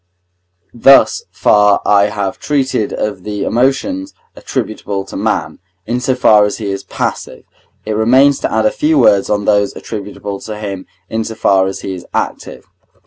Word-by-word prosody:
Thus 135 +3 +4
far 105 -1 +3
I 100 -1 +4
have 100 -2 -3
treated 135 -6 -1
of 100 -3 -3
the 105 -1 -4
emotions 205 - -1 0.2
attributable 100 -2 -4
to - - -10
man, - - -2 0.3
in 120 +3 -2
so 130 0 0
far 110 -4 +5
as 105 - -1
he 105 -3 -4
is 95 0 -5
passive. - - -5 0.4
It 110 - -3
remains 130 +6 +4
to - - -2
add 110 0 +1
a 110 - +3
few 155 0 +1
words 100 -7 +4
on 105 -1 0
those 100 -1 +1
attributable 100 -2 -6
to 110 -1 -7
him 100 -3 -6 0.2
in 110 +3 -2
so 110 - -6
far 95 -3 +2
as 95 - -5
he 95 - -5
is 90 - -9
active. - - -4
105 Hz, 170 wpm, -15 LUFS, 100-125 Hz, 0.4 s, far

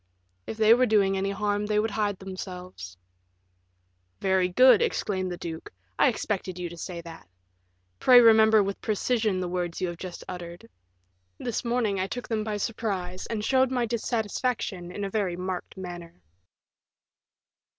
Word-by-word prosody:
"If 220 - -5
they 220 0 +6
were 250 +1 +3
doing 200 -3 +3
any 195 +1 -1
harm 205 +1 -1
they 210 0 +1
would 215 +1 +1
hide 205 -1 -1
themselves." 180 - -8 1.2
"Very 190 -1 +2
good," 255 - +6
exclaimed 190 - -1
the 175 - -5
duke, 165 -2 -7 0.3
"I - - +6
expected 195 -5 -2
you 175 -1 -4
to 170 - -9
say 170 0 -6
that. 165 - -12 0.7
Pray 250 -1 +8
remember 220 -2 +6
with 195 0 -4
precision 215 -2 0
the 180 - -2
words 175 -1 -3
you 185 - -1
have 170 - -7
just 185 -2 -7
uttered. 170 -6 -8 0.7
This 240 - -3
morning 235 -5 0
I 190 - 0
took 245 +4 -6
them 220 -2 -1
by 215 -1 -3
surprise, 195 -4 -3
and 215 -2 -3
showed 260 +1 +3
my 250 -2 0
dissatisfaction 225 -4 -2
in 205 +3 -5
a - - -3
very 190 -5 -1
marked 185 +1 -5
manner." 175 - -9
200 Hz, 160 wpm, -27 LUFS, 180-220 Hz, 1.2 s, Pray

